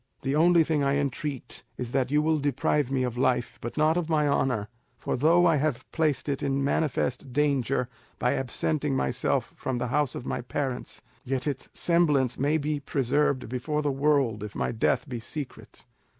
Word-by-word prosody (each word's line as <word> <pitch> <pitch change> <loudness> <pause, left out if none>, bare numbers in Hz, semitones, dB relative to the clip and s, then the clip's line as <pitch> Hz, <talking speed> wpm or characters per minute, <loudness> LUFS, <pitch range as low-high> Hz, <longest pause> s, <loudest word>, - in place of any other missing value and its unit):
The 135 +2 0
only 170 +1 +5
thing 155 -2 0
I 140 0 +2
entreat 140 -1 -3 0.2
is 120 -1 -4
that 130 -1 +1
you 150 +2 +2
will 160 0 +2
deprive 145 0 +1
me 135 -1 0
of 125 -1 -3
life, 125 -2 0
but 120 - -6
not 155 +2 +3
of 170 -2 -2
my 150 -2 +2
honour; 125 -7 +1 0.3
for - - -2
though 165 +6 +4
I 165 -3 +4
have 135 -3 -1
placed 155 -3 0
it 140 -2 -1
in 140 0 0
manifest 140 -2 0
danger 135 -2 +1 0.3
by 125 - +1
absenting 140 +2 -1
myself 65 - 0
from 130 -2 -3
the 125 0 -2
house 145 0 +1
of 125 - -6
my - - -2
parents, 130 0 -4 0.2
yet 130 0 -2
its 140 -3 -3
semblance 150 -7 +2
may 145 +4 +2
be 150 0 -1
preserved 140 0 0
before 130 +6 -2
the 145 - +1
world 135 -6 +1
if 105 0 -7
my - - -1
death 115 +5 +1
be 125 -3 -4
secret." 130 +3 -8
140 Hz, 185 wpm, -27 LUFS, 125-150 Hz, 0.3 s, only